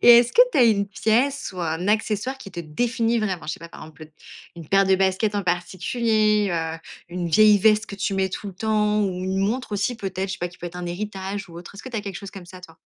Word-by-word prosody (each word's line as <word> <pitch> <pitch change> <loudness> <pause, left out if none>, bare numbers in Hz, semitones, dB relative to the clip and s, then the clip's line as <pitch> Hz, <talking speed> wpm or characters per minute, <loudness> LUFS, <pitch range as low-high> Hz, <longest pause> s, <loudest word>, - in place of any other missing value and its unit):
Et 240 -1 +9
est-ce 240 0 +2
que - - +8
tu - - +2
as - - +7
une 200 -3 +3
pièce 235 +8 0
ou 180 - -6
un 165 +3 -2
accessoire 215 +4 0
qui 200 - -10
te 175 - -6
définit 230 +8 0
vraiment? 190 -7 -2
Je 155 - -2
sais - - -14
pas, 170 - -9
par - - -13
exemple, 155 -1 -12
le 155 - -20 0.4
une 165 -3 -10
paire 195 0 +4
de 190 - +4
baskets 190 +3 +1
en 205 - 0
particulier, 210 +4 +1
heu, 160 -1 -2 0.3
une 175 0 -3
vieille 210 +4 +6
veste 215 +2 +3
que 200 - -8
tu 195 0 -1
mets 190 0 +1
tout 200 - -6
le 195 - -7
temps 210 +1 +1
ou 200 - +1 0.2
une 190 +1 -1
montre 220 +5 -1
aussi, 205 +4 0
peut-être, 190 -2 -4
je - - -3
sais - - -13
pas, 175 - -2
qui 175 - -18
peut 175 - -6
être 175 +1 -8
un 180 0 -5
héritage 195 +1 -5
ou 170 - -12
autre? 175 +3 -11
Est-ce 200 - -10
que - - -8
tu 245 - -5
as - - 0
quelque 200 -3 -6
chose 195 +2 -8
comme 190 -3 -11
ça, 185 +1 -12
toi? 165 -3 -14
195 Hz, 280 wpm, -23 LUFS, 180-215 Hz, 0.4 s, Et